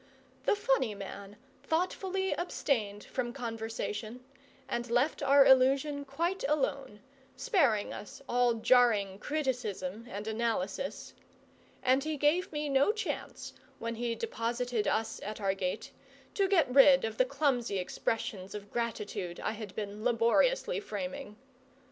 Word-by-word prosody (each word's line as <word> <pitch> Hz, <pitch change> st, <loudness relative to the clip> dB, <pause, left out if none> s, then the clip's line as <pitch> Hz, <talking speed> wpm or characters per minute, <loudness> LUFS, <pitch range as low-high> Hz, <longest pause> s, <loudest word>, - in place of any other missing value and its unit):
The -, -, +4 dB
funny 265 Hz, -, +1 dB
man 200 Hz, +1 st, -8 dB, 0.2 s
thoughtfully 375 Hz, +3 st, -1 dB
abstained 225 Hz, -, -1 dB
from 240 Hz, -2 st, -3 dB
conversation, 225 Hz, -1 st, -5 dB, 0.4 s
and 240 Hz, -1 st, -3 dB
left 245 Hz, +7 st, +1 dB
our 280 Hz, 0 st, +6 dB
illusion 275 Hz, +2 st, +4 dB
quite 335 Hz, +7 st, -2 dB
alone, 275 Hz, -7 st, -1 dB, 0.3 s
sparing 280 Hz, -, +2 dB
us 205 Hz, -, -9 dB
all 245 Hz, -1 st, +3 dB
jarring 220 Hz, -5 st, +3 dB
criticism 235 Hz, -8 st, -3 dB
and 205 Hz, -1 st, -5 dB
analysis; 220 Hz, +1 st, -2 dB, 0.7 s
and 260 Hz, +2 st, +3 dB
he 310 Hz, 0 st, -2 dB
gave 300 Hz, +6 st, +2 dB
me 300 Hz, -1 st, -2 dB
no 275 Hz, +6 st, +4 dB
chance, 440 Hz, 0 st, -5 dB, 0.2 s
when 230 Hz, 0 st, -4 dB
he 235 Hz, 0 st, -2 dB
deposited 240 Hz, -, -2 dB
us 220 Hz, 0 st, 0 dB
at 215 Hz, +2 st, -5 dB
our 195 Hz, -2 st, +1 dB
gate, 185 Hz, -2 st, -3 dB, 0.4 s
to 395 Hz, -1 st, +2 dB
get 330 Hz, -10 st, +3 dB
rid 270 Hz, -1 st, +7 dB
of 220 Hz, 0 st, -5 dB
the -, -, +7 dB
clumsy 260 Hz, -7 st, 0 dB
expressions 190 Hz, +1 st, -3 dB
of 205 Hz, -1 st, -8 dB
gratitude 210 Hz, -6 st, -3 dB
I -, -, -1 dB
had 215 Hz, -3 st, -8 dB
been 210 Hz, 0 st, -5 dB
laboriously 340 Hz, -, +2 dB
framing. 275 Hz, -, -6 dB
245 Hz, 130 wpm, -31 LUFS, 215-285 Hz, 0.7 s, rid